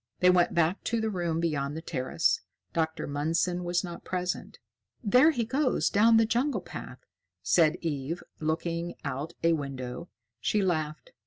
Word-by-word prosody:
They 180 0 +6
went 180 -1 +3
back 170 +3 +2
to 230 - 0
the 220 0 -1
room 170 -4 -1
beyond 150 -3 -1
the - - -5
terrace. 130 -6 0 0.3
Dr. 160 -1 -1
Mundson 165 +5 0
was 175 +1 0
not 175 -2 -7
present. 180 0 -3 0.5
"There 250 +8 +6
he 245 -8 0
goes 265 +3 +1
down 225 +2 +5
the 225 - +5
jungle 245 +6 0
path," - - -9 0.4
said 160 -2 +4
Eve, 155 +1 -3 0.2
looking 165 +2 -2
out 140 +4 -3
a 165 0 +5
window. 135 +1 -4 0.3
She 205 - +1
laughed. 155 - -2
170 Hz, 155 wpm, -29 LUFS, 155-200 Hz, 0.5 s, They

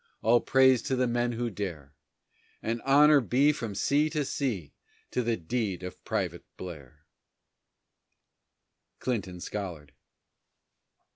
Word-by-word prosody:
All 120 +2 +5
praise 130 -2 +5
to 130 - +2
the 125 0 +2
men 120 0 0
who 120 0 -2
dare, 85 -9 -6 0.7
And 115 +1 -2
honor 145 +1 +6
be 135 +5 +3
from 115 -8 -5
sea 145 +9 +2
to 150 -2 -1
sea 110 - -3 0.4
to 125 - 0
the 115 -1 0
deed 95 0 -2
of 90 - -8
Private - - -2
Blair! 80 -8 -10 1.9
CLINTON 100 -8 -3
SCOLLARD. 85 -9 -6
115 Hz, 120 wpm, -29 LUFS, 90-130 Hz, 1.9 s, honor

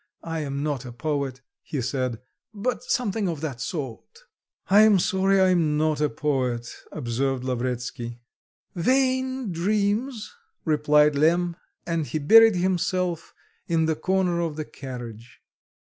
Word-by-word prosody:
I 165 -1 -3
am 140 -1 -3
not 145 -4 -2
a 125 - -8
poet," 140 0 -3 0.2
he 145 - -4
said, 125 -2 -2 0.4
"but 235 +5 -2
something 220 -6 0
of 160 -4 -4
that 135 -7 -4
sort." 140 - -6 0.5
"I 205 +2 +6
am 215 -2 +6
sorry 190 +2 +2
I 190 0 +5
am 160 -5 +2
not 155 -1 +1
a 150 - +2
poet," 130 -5 -2 0.2
observed 130 -1 -2
Lavretsky. 120 -1 -3 0.6
"Vain 260 +3 +1
dreams!" 210 - -1 0.3
replied 150 -1 +4
Lemm, 170 +4 +2 0.3
and 165 -3 -1
he - - -2
buried 225 +8 +7
himself 180 -1 -1 0.3
in 165 -1 +2
the 160 0 +1
corner 185 0 0
of 165 -3 -2
the 155 0 -4
carriage. 120 -5 -9
155 Hz, 135 wpm, -25 LUFS, 135-190 Hz, 0.6 s, buried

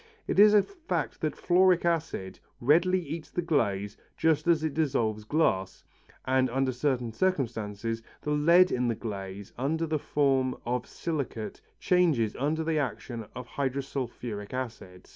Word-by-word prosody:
It - - 0
is 210 +1 +8
a 205 - +6
fact 350 -4 -4
that - - -1
fluoric 180 -1 +3
acid 155 - -1 0.2
readily 170 +8 +4
eats 160 0 -6
the 175 - -2
glaze 105 - 0 0.2
just 160 -1 +2
as 165 -2 +3
it 155 -3 -1
dissolves 120 -9 0
glass, 95 - 0 0.4
and 130 0 +2
under 130 +1 +1
certain 125 -2 -1
circumstances 115 - -1 0.2
the 150 - -2
lead 170 +5 +5
in 125 0 +1
the 115 - 0
glaze 100 -2 -6
under 160 +5 0
the 155 -1 -1
form 135 -3 +1
of 125 0 -2
silicate 140 -9 -4 0.2
changes 160 - +2
under 155 +4 0
the 160 -1 0
action 120 -4 -4
of 125 - -6
hydrosulphuric 125 -6 -4
acid. 110 -8 -6
135 Hz, 145 wpm, -28 LUFS, 115-160 Hz, 0.4 s, is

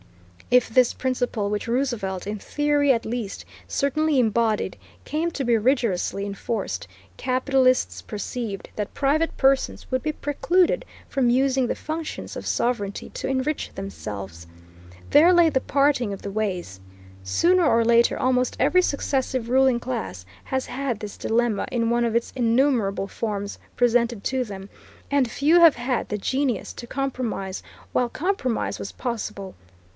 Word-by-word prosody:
If 250 -1 +5
this 250 +1 +3
principle 245 -5 -1
which 210 +1 -2
Roosevelt, 230 -7 -1
in 210 +1 -3
theory 290 +3 +2
at 230 -2 +1
least, 225 -3 -4 0.2
certainly 295 +1 +1
embodied, 225 -2 +1 0.3
came 325 +3 -1
to 275 -4 -3
be 235 -1 +3
rigorously 215 -5 0
enforced, 200 - -3 0.3
capitalists 255 - +1
perceived 210 -1 -5
that 210 -1 -4
private 300 +4 +1
persons 270 0 +1
would 255 0 +1
be 310 - 0
precluded 345 - +1 0.2
from 265 -3 +1
using 260 +1 +2
the - - -1
functions 315 0 -5
of - - -6
sovereignty 220 -5 -1
to - - -4
enrich 270 +3 -1
themselves. 100 - -7 0.7
There 325 +5 +7
lay 345 -2 +6
the 265 -4 +1
parting 275 -5 +2
of 195 - -7
the 200 - -4
ways. 180 - -3 0.4
Sooner 345 - +3
or 230 -5 +3
later 235 0 +4
almost 255 -1 +1
every 365 - +4
successive 265 -6 -1
ruling 260 -1 +4
class 95 - -5 0.2
has 265 0 -2
had 250 -3 -3
this 210 -2 -7
dilemma 230 -2 0
in 235 -2 +1
one 240 0 +2
of 230 -1 0
its 235 - 0
innumerable 235 -5 +2
forms 205 -2 -4 0.2
presented 235 -3 +2
to 260 -1 0
them, 195 -4 -8 0.4
and 270 -5 +2
few 315 +5 +4
have 330 -3 +8
had 245 +1 -2
the 210 - -1
genius 260 0 -1
to 235 - -9
compromise 250 -8 -3 0.3
while 245 -1 +1
compromise 295 - -1
was - - -5
possible. 210 -6 -5
245 Hz, 145 wpm, -24 LUFS, 210-275 Hz, 0.7 s, have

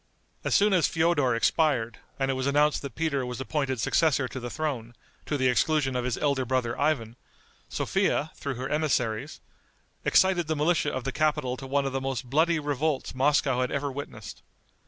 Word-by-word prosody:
As - - +1
soon 205 0 +4
as 180 -3 +4
Feodor 160 -7 +2
expired, 120 -3 +1 0.2
and 135 0 0
it - - 0
was 130 +1 -2
announced 145 +1 +2
that 140 -5 -7
Peter 155 -4 0
was 125 0 -5
appointed 130 -2 -2
successor 140 +1 +2
to 130 - -6
the 120 0 -5
throne, 125 -6 -4 0.3
to 145 - 0
the 130 -1 +2
exclusion 135 +1 +2
of 125 -1 -1
his 125 -2 -1
elder 140 -3 +1
brother 125 -2 -1
Ivan, 125 -6 0 0.5
Sophia, 150 - 0
through 140 -2 -5
her 130 +2 -4
emissaries, 125 -8 -1 0.6
excited 185 -3 +3
the 160 - 0
militia 155 +3 +1
of 130 - -4
the 135 - -2
capital 140 -4 0
to 135 +1 -9
one 140 +1 +1
of 135 - -2
the 135 - -1
most 130 -2 -4
bloody 165 +3 +3
revolts 145 -1 -1
Moscow 135 -1 +2
had 125 - 0
ever 140 0 -2
witnessed. 130 -6 -8
135 Hz, 185 wpm, -27 LUFS, 125-150 Hz, 0.6 s, soon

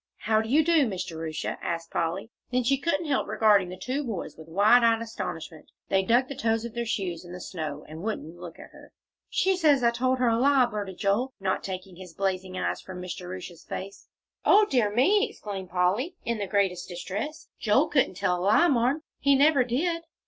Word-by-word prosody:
"How 220 0 +2
do 220 - -6
you 300 +4 +4
do, 320 -5 +4
Miss 190 -4 -3
Jerusha?" 160 -1 -5
asked 165 -1 -4
Polly. 180 +7 -2 0.2
Then 250 0 +1
she 270 +3 +2
couldn't 335 +1 0
help 285 -3 0
regarding 205 -4 +3
the 185 - -7
two 270 +7 -3
boys 225 -8 -5
with 160 0 -13
wide 210 +8 +5
eyed 230 -1 +4
astonishment; 165 -8 -6 0.2
they 195 - +3
dug 240 +6 +2
the 275 - -5
toes 225 -2 0
of 235 - -7
their 235 -1 -3
shoes 185 -6 -2
in 175 0 -10
the 180 - -7
snow, 155 -5 -6
and 155 +2 -9
wouldn't 185 -6 -4
look 175 -2 -9
at - - -12
her. - - -16 0.4
"She 380 0 +2
says 300 -7 +3
I 235 - +5
told 255 +2 +1
her 250 -1 +2
a 230 0 +2
lie," 270 0 +5
blurted 205 -5 -5
Joel, 225 +6 0
not 190 -1 -1
taking 185 -1 -6
his 180 -3 -11
blazing 185 -1 -2
eyes - - -2
from 185 -1 -9
Miss 180 0 -5
Jerusha's 180 -1 -8
face. 195 +1 -7 0.4
"O 420 +2 +6
dear 245 - +2
me!" 385 - +3
exclaimed 195 -3 -7
Polly, 190 - 0
in 235 -2 -1
the 200 - -2
greatest 190 -3 0
distress. 205 - -5
"Joel 240 +7 +3
couldn't 270 -11 +1
tell 180 -2 0
a - - -4
lie, 210 - +4
Marm; 265 +3 +1 0.2
he 280 0 +4
never 280 -1 +5
did." 330 +8 -1
215 Hz, 210 wpm, -27 LUFS, 185-255 Hz, 0.4 s, O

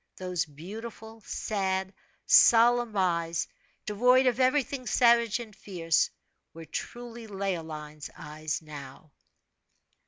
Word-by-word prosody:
Those 180 -2 -2
beautiful, 220 +8 -9
sad, 190 -2 -2 0.3
solemn 235 -1 +5
eyes, 170 -3 0 0.4
void 250 +5 +4
of 250 -1 +2
everything 260 0 +1
savage 235 -2 +4
and 220 -4 -9
fierce, 165 -6 0 0.5
were 165 0 -9
truly 235 +7 -7
Leoline's 160 -7 -5
eyes 155 +1 -5
now. 145 -1 -11
195 Hz, 95 wpm, -28 LUFS, 165-235 Hz, 0.5 s, solemn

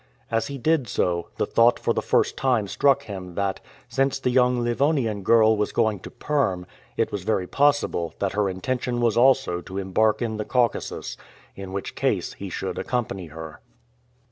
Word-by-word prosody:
As 115 +4 0
he 140 -1 -5
did 155 -1 +1
so, 85 -4 -1
the - - +1
thought 115 +1 +4
for - - 0
the - - -1
first - - +1
time 125 -6 +1
struck 140 +7 +2
him 95 -4 -8
that, 100 -1 -1 0.3
since 135 0 0
the 130 -2 -1
young 125 0 +3
Livonian 120 -3 +1
girl 110 +2 +5
was 105 0 -1
going 110 -4 +1
to - - -9
Perm, 135 -12 -1 0.3
it - - +1
was 100 - -3
very 95 -1 0
possible 140 - +1
that 100 -1 -1
her 100 -1 +1
intention 120 +6 -2
was 115 -3 +2
also 125 -8 +3
to 95 +2 -8
embark 100 +3 +1
in 115 -3 -2
the 105 - -2
Caucasus, 120 0 -1 0.4
in 95 -1 -8
which 100 0 -4
case - - -1
he - - -7
should - - -4
accompany 110 -8 -3
her. 80 +3 -9
110 Hz, 180 wpm, -24 LUFS, 95-125 Hz, 0.4 s, girl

